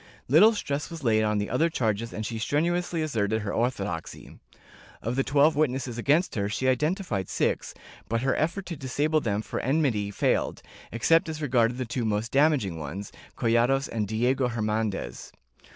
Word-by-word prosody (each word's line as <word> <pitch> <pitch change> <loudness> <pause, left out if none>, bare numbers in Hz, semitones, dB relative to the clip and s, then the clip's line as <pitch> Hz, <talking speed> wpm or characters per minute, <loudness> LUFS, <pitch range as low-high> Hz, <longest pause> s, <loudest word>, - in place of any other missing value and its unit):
Little 185 - +6
stress 145 -8 -3
was 165 -3 -8
laid 110 -3 +3
on 105 -1 +1
the 105 0 -1
other 160 +8 +2
charges 115 -5 -1
and 110 - -5
she 110 +2 -4
strenuously 170 +6 0
asserted 110 -7 -1
her 100 - -3
orthodoxy. 100 -8 -3 0.6
Of 115 +3 -3
the 135 - +2
twelve 145 +3 +3
witnesses 130 -5 -1
against 150 +9 +2
her 100 -2 -1
she 120 +5 -1
identified 140 - 0
six, - - -1 0.3
but 115 +1 0
her 135 - +2
effort 170 +5 -1
to 170 - -5
disable 145 +3 0
them 105 -3 -1
for - - -4
enmity 130 -7 +1
failed, 100 - 0 0.3
except 165 - +3
as 155 -1 -5
regarded 125 -5 +1
the 130 - -2
two 120 +1 -3
most 110 +1 -1
damaging 135 - +2
ones, 85 +7 -6 0.3
Collados 120 +4 +2
and 110 -3 -2
Diego 125 +5 +1
Her 120 -3 -3
nandez. 105 - -3
125 Hz, 170 wpm, -27 LUFS, 110-150 Hz, 0.6 s, Little